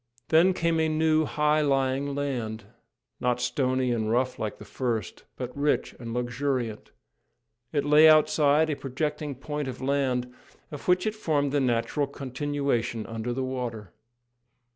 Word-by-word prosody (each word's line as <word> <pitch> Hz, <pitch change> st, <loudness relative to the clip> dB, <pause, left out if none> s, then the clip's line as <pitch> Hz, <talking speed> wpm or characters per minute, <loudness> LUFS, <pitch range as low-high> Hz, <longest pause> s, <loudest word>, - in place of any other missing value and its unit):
Then 175 Hz, +4 st, +5 dB
came 165 Hz, -1 st, +1 dB
a 160 Hz, 0 st, +2 dB
new, 155 Hz, 0 st, +2 dB
high 150 Hz, +1 st, +2 dB
lying 135 Hz, 0 st, 0 dB
land, 120 Hz, -6 st, -3 dB, 0.6 s
not 125 Hz, 0 st, 0 dB
stony 130 Hz, 0 st, 0 dB
and 110 Hz, -2 st, -1 dB
rough 125 Hz, +2 st, 0 dB
like 110 Hz, -, -3 dB
the -, -, -11 dB
first, 115 Hz, -7 st, -3 dB
but -, -, -5 dB
rich 145 Hz, +1 st, 0 dB
and 115 Hz, -2 st, -6 dB
luxuriant. 120 Hz, -1 st, -2 dB, 0.8 s
It 145 Hz, -2 st, 0 dB
lay 150 Hz, +2 st, +7 dB
outside 155 Hz, 0 st, +4 dB
a -, -, -1 dB
projecting 150 Hz, +2 st, -3 dB
point 150 Hz, +2 st, -4 dB
of 130 Hz, -1 st, -6 dB
land, 130 Hz, -2 st, 0 dB, 0.4 s
of 145 Hz, -, -8 dB
which 180 Hz, 0 st, +3 dB
it 215 Hz, -, 0 dB
formed 150 Hz, -9 st, 0 dB
the 145 Hz, 0 st, +1 dB
natural 130 Hz, +3 st, 0 dB
continuation 135 Hz, -4 st, -2 dB
under 115 Hz, +1 st, -4 dB
the 130 Hz, +2 st, -2 dB
water. 120 Hz, -7 st, -5 dB
135 Hz, 145 wpm, -27 LUFS, 125-150 Hz, 0.8 s, lay